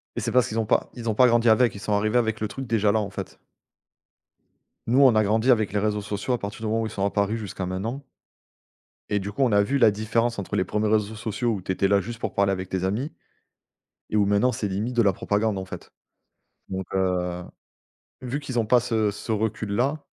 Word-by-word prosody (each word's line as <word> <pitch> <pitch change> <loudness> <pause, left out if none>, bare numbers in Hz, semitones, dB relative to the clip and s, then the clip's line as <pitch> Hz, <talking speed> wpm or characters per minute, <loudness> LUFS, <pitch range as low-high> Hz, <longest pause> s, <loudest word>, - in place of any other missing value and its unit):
Et - - -2
c'est - - -2
parce 125 -3 +3
qu'ils 110 - -2
ont 110 - 0
pas - - +1
ils 115 -2 -4
ont 110 - 0
pas 125 +3 +6
grandi 120 -1 +3
avec. 115 +2 +4
Ils - - -7
sont 105 +1 -2
arrivés 105 +3 +2
avec 110 -2 0
le 110 - 0
truc 135 +6 -7
déjà 105 -2 +2
là, 110 - +2
en 100 - -3
fait. 95 - -8 1.5
Nous, 125 +4 +3
on 135 -3 +7
a 110 - +4
grandi 110 +5 +3
avec 110 -4 +2
les 105 - +1
réseaux 105 0 0
sociaux 100 +4 -3
à 120 - 0
partir 100 +2 -6
du - - -4
moment 110 +1 0
où 110 - -1
ils - - -6
sont 100 -2 -2
apparus 100 +2 0
jusqu'à 100 -3 -5
maintenant. 110 +10 -4 1.1
Et 105 - +1
du 100 +1 -5
coup, 135 - -2
on 130 - +4
a 100 -1 +4
vu 135 +7 0
la 115 -4 +6
différence 110 +3 -1
entre 100 - -5
les - - +2
1ers 105 +3 -1
réseaux 110 0 +1
sociaux, 115 +2 -2
où 100 - -4
tu 95 - -2
étais 95 +1 +1
là 100 0 +4
juste 115 +3 -7
pour - - -3
parler 100 0 +2
avec 95 -1 -4
tes 95 -1 -2
amis 120 - -2 1.0
et - - 0
où, 105 -1 +3
maintenant, 100 +5 +3
c'est 110 -3 -3
limite 105 +6 -3
de 120 - +5
la 100 -3 +3
propagande, 105 +2 0
en 95 - -4
fait. 95 - -10 0.8
Donc 95 0 -4
heu, 90 -2 -1 0.8
vu 130 +2 -3
qu'ils 130 -4 -4
ont 115 - +1
pas 125 +2 +5
ce 110 -3 0
ce 105 +2 -5
recul-là 110 +6 -1
110 Hz, 240 wpm, -25 LUFS, 100-115 Hz, 1.5 s, on